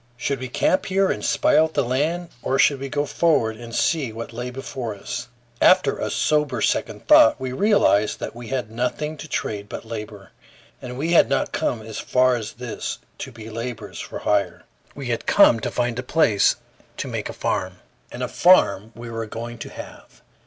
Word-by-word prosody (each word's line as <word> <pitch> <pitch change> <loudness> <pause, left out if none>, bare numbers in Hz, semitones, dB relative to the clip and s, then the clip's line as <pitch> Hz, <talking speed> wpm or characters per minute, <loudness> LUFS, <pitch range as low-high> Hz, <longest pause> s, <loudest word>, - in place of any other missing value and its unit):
Should 135 +1 -2
we 130 - -4
camp 185 - +1
here 195 0 +2
and - - -4
spy - - +2
out 160 0 +3
the 140 - +2
land, 155 +8 -1
or 135 - 0
should 140 -1 +4
we 135 0 -5
go 145 +1 -1
forward 145 -9 +1
and 115 0 -8
see 150 -8 +1
what 115 +1 -7
lay 120 +2 -4
before 125 -3 -5
us? 100 - -6 0.3
After 185 0 +5
a - - -2
sober 150 -5 +1
second - - -1
thought, 115 - +7
we 130 -1 -4
realized 130 - +3
that - - -6
we 120 -1 -9
had 125 -4 -3
nothing 125 +6 -2
to 155 - -8
trade 105 -7 -3
but - - -7
labor; 105 -4 -8 0.5
and 125 0 -7
we 160 +5 -1
had 170 - +5
not 135 - 0
come 115 -3 -1
as 110 0 -7
far 130 0 +3
as 110 -3 -5
this 120 -1 -5 0.2
to 135 - -6
be 115 -2 -10
laborers 115 +1 -6
for - - -6
hire. 100 -4 0 0.3
We 135 -3 -6
had 115 - -2
come 200 - +6
to - - -3
find 120 -1 -1
a - - 0
place 125 -6 +3 0.4
to - - -4
make - - -4
a - - -3
farm, - - -2 0.4
and - - -5
a - - -1
farm 110 - +4
we 115 0 -8
were 115 -1 -4
going 115 +2 -7
to - - -7
have. - - -12
125 Hz, 200 wpm, -23 LUFS, 115-145 Hz, 0.5 s, thought